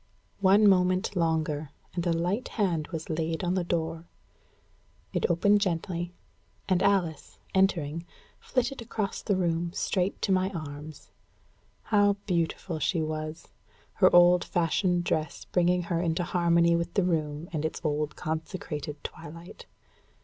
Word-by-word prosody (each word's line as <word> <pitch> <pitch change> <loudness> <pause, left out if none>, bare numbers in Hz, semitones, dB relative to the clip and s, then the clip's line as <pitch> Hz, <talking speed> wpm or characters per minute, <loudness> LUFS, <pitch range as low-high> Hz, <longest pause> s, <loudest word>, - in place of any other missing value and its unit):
One 200 +2 +5
moment 185 0 +3
longer, 160 -3 0 0.2
and 175 0 -2
a - - +3
light 180 +8 0
hand 175 -8 -1
was 165 -3 -6
laid 160 +2 -2
on 175 0 +1
the 185 -1 0
door. 165 -1 -2 1.1
It - - +1
opened 200 +5 +4
gently, 175 -1 -1 0.6
and 185 -1 +2
Alice, 190 -6 0 0.2
entering, 170 -4 +1 0.3
flitted 255 0 -1
across 215 -3 -3
the 200 - 0
room 170 -2 0
straight 190 0 -1
to 200 - +1
my 185 0 +2
arms. 150 -1 -8 0.7
How 205 -2 +4
beautiful 170 -2 -1
she 160 +2 +1
was! 155 0 -5 0.4
her - - +5
old 175 0 +6
fashioned 175 +1 +1
dress 155 -3 -2
bringing 180 0 +2
her 170 -1 -1
into 170 0 0
harmony 170 -1 +3
with 170 0 -2
the 195 - +3
room 155 -2 -1
and 155 -2 -1
its 160 - -2
old 150 0 -1
consecrated 155 -2 -5
twilight! 165 +3 -9
170 Hz, 135 wpm, -28 LUFS, 160-185 Hz, 1.1 s, old